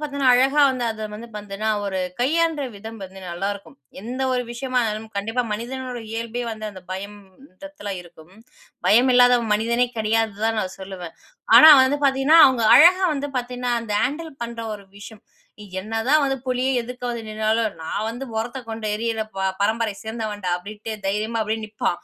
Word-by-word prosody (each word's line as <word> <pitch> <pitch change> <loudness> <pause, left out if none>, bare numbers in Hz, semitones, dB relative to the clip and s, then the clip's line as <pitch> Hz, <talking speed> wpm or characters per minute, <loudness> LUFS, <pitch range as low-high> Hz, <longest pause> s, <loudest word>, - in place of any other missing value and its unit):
பார்த்தீங்கன்னா, 280 -4 +2
அழகா 270 +4 +4
வந்து 250 -2 -3
அத 220 -1 -5
வந்து 230 +3 -9
பாத்தீங்கன்னா, 205 +1 -3
ஒரு 190 -2 -2 0.2
கையாளற 320 +2 +1
விதம் 220 +2 -9
வந்து 190 0 -12
நல்லாருக்கும். 195 -2 -5 0.3
எந்த 250 +4 -5
ஒரு 250 - 0
விஷயமா 255 +1 -1
இருந்தாலும். 220 0 -4
கண்டிப்பா 225 +5 -1
மனிதனோட 250 +3 -5
இயல்பே 230 +1 -4
வந்து 215 -1 -6
அந்த 185 -2 -12
பயம்ன்றத்துல 205 +4 -9
இருக்கும். 170 +1 -17 0.5
பயம் 245 +4 +5
இல்லாதவன் 245 -3 +5
மனிதனே 235 +3 +1
கிடையாதுன்னு 220 -1 0
தான் 225 -1 0
நான் 185 -1 -5
சொல்லுவன். 185 -3 -8 0.4
ஆனா, 315 - +10 0.2
வந்து 285 +2 0
பாத்தீங்கன்னா, 270 +4 +4
அவங்க 255 -3 +1
அழகா 365 +5 +7
வந்து 285 0 -3
பாத்தேனா, 245 0 -3
அந்த 215 - -5
ஹேண்டில் 315 +3 -4
பண்ற 235 0 -7
ஒரு 200 -1 -12
விஷயம். 215 +1 -12 0.5
என்னதான் 225 +9 +1
வந்து 270 -1 +1
புலி 255 0 -1 0.2
எதுக்க 250 +2 -8
வந்து 235 -1 -4
நின்னாலும், 215 0 0
நான் 160 +6 -3
வந்து 245 +4 -5
முறத்த 240 +4 -3
கொண்டு 220 -1 -5
எரியிற 225 0 -2 0.2
ப - - -4 0.2
பரம்பரய 220 0 0
சேந்தவன் 220 -2 -5
டா 180 - 0
அப்டின்ட்டு 210 +4 -8
தைரியமா 215 +3 -1
அப்டியே 220 +1 -3
நிப்பா. 215 0 -2
225 Hz, 165 wpm, -22 LUFS, 210-250 Hz, 0.5 s, ஆனா